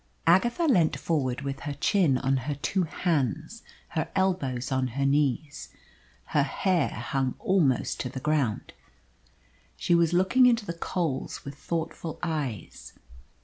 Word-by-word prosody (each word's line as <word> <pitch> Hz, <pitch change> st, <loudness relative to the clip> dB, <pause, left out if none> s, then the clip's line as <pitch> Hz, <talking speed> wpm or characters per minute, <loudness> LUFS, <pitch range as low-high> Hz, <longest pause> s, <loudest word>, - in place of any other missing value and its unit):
Agatha 235 Hz, -, +3 dB
leant 180 Hz, -, +3 dB
forward 135 Hz, -6 st, -1 dB
with 140 Hz, -1 st, -4 dB
her 145 Hz, -1 st, -5 dB
chin 155 Hz, -2 st, +2 dB
on 135 Hz, +1 st, +1 dB
her 135 Hz, +3 st, -3 dB
two 180 Hz, +6 st, -1 dB
hands, 160 Hz, -, -1 dB, 0.3 s
her 160 Hz, -2 st, -2 dB
elbows 140 Hz, -11 st, 0 dB
on 130 Hz, -1 st, +1 dB
her 140 Hz, -, +1 dB
knees. 145 Hz, +1 st, 0 dB, 0.6 s
Her 145 Hz, -, +4 dB
hair 165 Hz, +3 st, +1 dB
hung 130 Hz, +3 st, -2 dB
almost 155 Hz, -10 st, +1 dB
to 125 Hz, -, -3 dB
the 130 Hz, -, -6 dB
ground. 140 Hz, -6 st, -1 dB, 1.0 s
She -, -, +1 dB
was 170 Hz, -1 st, +4 dB
looking 190 Hz, +9 st, +4 dB
into 235 Hz, -3 st, +2 dB
the 170 Hz, -, -4 dB
coals 165 Hz, -5 st, -3 dB
with 140 Hz, -, -6 dB
thoughtful 165 Hz, +2 st, -4 dB
eyes. 145 Hz, -, -4 dB
150 Hz, 140 wpm, -27 LUFS, 135-175 Hz, 1.0 s, Her